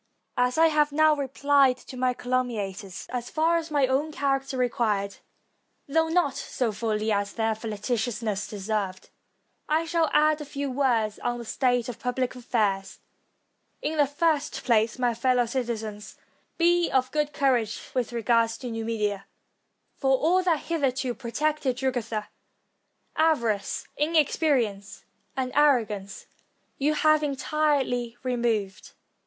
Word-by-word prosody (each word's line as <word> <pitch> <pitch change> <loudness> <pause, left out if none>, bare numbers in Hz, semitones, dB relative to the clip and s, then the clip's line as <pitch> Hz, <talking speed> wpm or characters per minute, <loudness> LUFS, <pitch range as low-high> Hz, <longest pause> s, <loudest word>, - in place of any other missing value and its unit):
As 250 +2 +2
I 325 - +6
have 300 -1 +2
now 310 +1 +4
repHed 275 -1 +2
to 260 - -9
my 250 0 0
caltmmiators, 220 -7 -3
as 245 -1 -4
far 325 +2 +2
as 330 -1 -4
my 290 -3 +3
own 270 +4 0
character 275 -2 -1
required, 215 -5 0 0.7
though 320 +3 +2
not 325 -5 +2
so 255 -4 -2
fully 215 0 -1
as 200 -1 0
their 225 -1 0
flagitiousness 220 -1 -3
deserved, 200 -2 -3 0.6
I 315 +2 +2
shall 330 -1 +1
add 305 0 +3
a - - -5
few 280 -1 -4
words 240 -6 +1
on 240 0 -2
the 235 - -7
state 245 0 +1
of 245 - -6
pubhc 250 0 -2
affairs. 210 -6 -1 0.9
In 310 +1 -1
the 290 - +5
first 300 0 0
place, 225 -1 +2
my 245 -2 +1
fellow 250 +1 +2
citizens, 225 -4 -4 0.4
be 345 0 +3
of 260 -1 +1
good 300 -1 0
courage 250 -7 +1
with 250 -3 -1
regard 230 0 +2
to 235 +2 -6
Numidia; 215 -3 -2 0.7
for 265 -1 +3
aU 355 +4 +3
that 340 -5 +1
hitherto 275 -5 -1
protected 270 +2 -1
Jugurtha, 235 -5 -2 0.9
avarice, 235 -11 +1
inexperi 300 -3 +3
ence, 200 -1 -10 0.3
and 255 -1 -1
arrogance, 225 -9 +1 0.5
you 300 +2 +2
have 310 0 +4
entirely 275 -4 0
removed. 235 -6 -1
255 Hz, 135 wpm, -26 LUFS, 225-295 Hz, 0.9 s, I